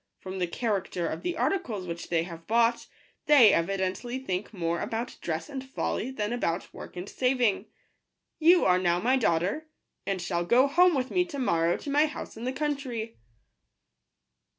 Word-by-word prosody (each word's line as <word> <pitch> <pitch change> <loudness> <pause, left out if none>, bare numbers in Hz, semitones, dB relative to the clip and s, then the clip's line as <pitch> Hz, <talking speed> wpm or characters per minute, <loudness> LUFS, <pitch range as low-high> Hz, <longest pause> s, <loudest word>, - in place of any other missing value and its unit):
From 190 0 -7
the 180 - 0
character 190 -3 -2
of - - -4
the 350 -1 -3
articles 240 - -1
which 170 -1 -6
they 165 -1 +1
have 165 -1 -10
bought, 235 +1 +2 0.4
they 275 -8 +7
evidently 190 +7 -1
think 200 -7 -4
more 170 -4 -2
about 230 +2 -4
dress 165 -1 -3
and 265 -2 -6
folly 260 -2 -3
than 225 -4 -3
about 175 -7 -2
work - - -10
and 180 +2 -5
saving. 250 -5 +1 0.7
You 345 +3 +6
are 180 0 +4
now 175 -1 +2
my 250 +7 +2
daughter, 205 - 0 0.4
and 195 -1 -1
shall 175 -1 -1
go 240 +9 +4
home 350 +4 +4
with 260 -1 -1
me 360 - +3
to 335 -5 -7
morrow 170 -9 +1
to 285 - -6
my 295 +2 +4
house 300 - -8
in 225 +2 -7
the 255 - 0
country." 260 -6 -3
225 Hz, 175 wpm, -28 LUFS, 180-265 Hz, 0.7 s, they